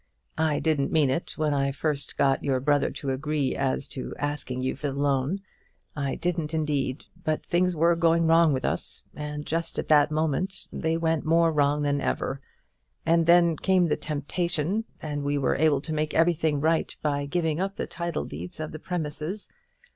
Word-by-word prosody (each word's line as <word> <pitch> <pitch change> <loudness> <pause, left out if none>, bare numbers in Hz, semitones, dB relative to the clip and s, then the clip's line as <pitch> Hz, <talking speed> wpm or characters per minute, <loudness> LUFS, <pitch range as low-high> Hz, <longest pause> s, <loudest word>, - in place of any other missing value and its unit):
I 155 -2 +2
didn't 150 -3 +1
mean 150 -5 +3
it 165 - -3
when 155 -2 +1
I 140 -1 +1
first 145 0 -2
got 135 -1 +2
your 135 -2 +1
brother 145 +2 +2
to 135 - -4
agree 145 0 -1
as 135 0 -1
to 130 - -6
asking 145 -3 -3
you 130 - -1
for 145 +2 -3
the 135 - -6
loan; 140 +6 +1 0.5
I 140 -2 -2
didn't 165 -3 -2
indeed; 145 -4 -1 0.2
but 155 -1 -1
things 180 +1 +1
were 170 +2 +4
going 165 0 +3
wrong 165 0 +5
with 130 -2 -1
us, - - -1
and 150 0 -5
just 165 +1 -2
at - - -3
that 150 -1 +6
moment 160 +5 -1
they 160 0 0
went 165 -2 0
more 165 +1 +4
wrong 145 0 +2
than 145 -1 +1
ever; 135 0 -2 0.6
and 165 0 +3
then 170 -1 +6
came 185 -2 +3
the - - +2
temptation, 170 +6 -2 0.2
and 145 -2 -3
we 145 0 0
were 135 - +1
able 150 -2 +3
to 160 +1 -4
make 155 0 -1
everything 160 -2 +2
right 160 +2 +1
by 145 -1 0
giving 160 +1 0
up 195 +1 -2
the - - -3
title 170 -2 -3
deeds 85 - -7
of 155 -1 -4
the 155 - -7
premises. 160 +3 -4
155 Hz, 185 wpm, -26 LUFS, 145-165 Hz, 0.6 s, that